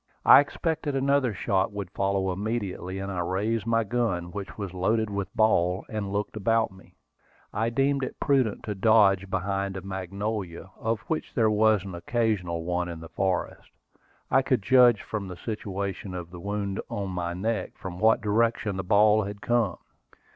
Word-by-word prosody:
I - - +10
expected 150 0 -1
another 135 -2 +2
shot 95 0 0
would 100 -3 -6
follow 95 -1 0
immediately, 95 -3 -3
and 95 0 -4
I 90 - -3
raised 105 +5 -1
my 115 0 +2
gun, 100 -6 -1
which 100 0 -7
was 100 -4 -5
loaded 105 +4 0
with 100 -1 -3
ball, 90 -4 +2
and 105 -3 -3
looked 105 +2 -2
about 115 +1 +1
me. 95 0 -18 0.6
I 115 +3 0
deemed 135 +3 +1
it 130 - -5
prudent 130 -7 +1
to 105 - -3
dodge 100 -2 +4
behind 95 0 -2
a - - -5
magnolia, 95 0 -4
of 115 0 -1
which 155 +7 -4
there 110 -3 +3
was 110 -2 +3
an 95 - -7
occasional 90 -3 -1
one 90 0 -1
in 85 -1 -6
the 80 0 -10
forest. 95 -2 -2 0.6
I 135 - +5
could 130 -5 0
judge 125 -2 +5
from 105 -3 -4
the 90 -1 -8
situation 100 -2 -4
of 85 -1 -6
the 90 - -9
wound 100 +1 -3
on 100 -2 -3
my 85 -1 -3
neck 110 +4 -2
from 90 -2 -7
what 110 +2 +4
direction 110 -1 +1
the 95 - -2
ball 105 +3 +4
had 100 +1 -6
come. 115 -5 +1
100 Hz, 175 wpm, -27 LUFS, 95-115 Hz, 0.6 s, I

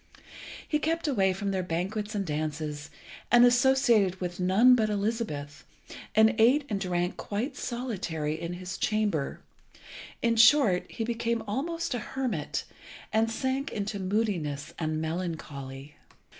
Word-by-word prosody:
He 300 - +1
kept 325 +1 -1
away 195 -9 +2
from 195 +1 -2
their 190 -1 0
banquets 195 +5 -3
and 200 -1 -1
dances, 150 -1 -3 0.4
and 240 0 +8
associated 245 -6 +4
with 175 -1 -4
none 195 +8 +5
but 220 -3 +3
Elizabeth, 200 -9 -3 0.5
and 220 +1 +6
ate 265 +6 +5
and 205 - -1
drank 175 -1 -1
quite 235 +7 -3
solitary 190 - -3
in 170 +2 -5
his 180 +1 -6
chamber. 210 -9 0 0.8
In 230 -1 +2
short, 220 -5 +5
he 225 - -4
became 230 0 -1
almost 325 +9 -2
a 245 - -1
hermit, 235 - -3 0.5
and 220 +1 +3
sank 260 +4 -2
into 205 -1 -3
moodiness 185 -8 -2
and 155 -1 -1
melancholy. 150 -5 -5
205 Hz, 130 wpm, -28 LUFS, 170-235 Hz, 0.8 s, and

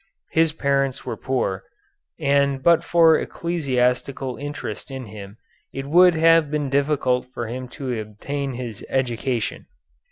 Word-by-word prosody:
His 160 -1 +3
parents 140 -3 0
were - - -3
poor, 125 -8 -2 0.6
and 140 -1 +2
but 170 -1 +5
for 165 -2 +5
ecclesiastical 130 -5 -1
interest 145 0 -6
in 130 -2 -6
him 100 -1 -10 0.3
it 135 0 -5
would 175 +4 +6
have 165 -1 +5
been 150 -2 -2
difficult 140 -3 +1
for 120 - -4
him 125 +3 -5
to 125 -2 -4
obtain 135 +6 -4
his 120 -4 -6
education. 120 -2 -2
135 Hz, 130 wpm, -23 LUFS, 125-150 Hz, 0.6 s, would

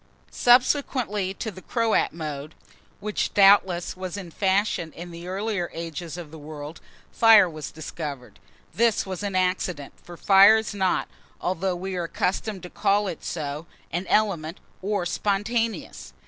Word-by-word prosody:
SUBSEQUENTLY 245 -6 +2
TO 220 - -4
THE 185 -1 -12
CROAT 230 0 +1
MODE, 155 -2 -6 0.4
which, 210 0 -2
doubtless, 195 -3 +5
was 185 0 -5
in 180 -4 -8
fashion 190 -3 0
in 175 +1 -9
the 170 +1 -9
earlier 195 -1 -2
ages 165 0 -6
of 165 -4 -8
the 160 - -10
world, 150 +1 -9 0.3
fire 225 -4 +7
was 155 -3 -7
discovered. 145 -7 -7 0.3
This 230 -1 +2
was 190 -1 -5
an 200 -2 -3
accident; 180 -5 -1
for 175 -1 -12
fire 195 +4 +7
is 220 -1 -3
not, 190 -2 0 0.3
although 185 +1 -1
we 190 +2 -5
are 175 - -1
accustomed 190 +3 -2
to 180 - -7
call 205 0 +1
it 170 - -6
so, 150 0 -4 0.2
an 175 +3 -3
element, 180 -6 +1 0.2
or 200 -2 -1
spontaneous. 215 +5 -2
185 Hz, 145 wpm, -25 LUFS, 165-205 Hz, 0.4 s, fire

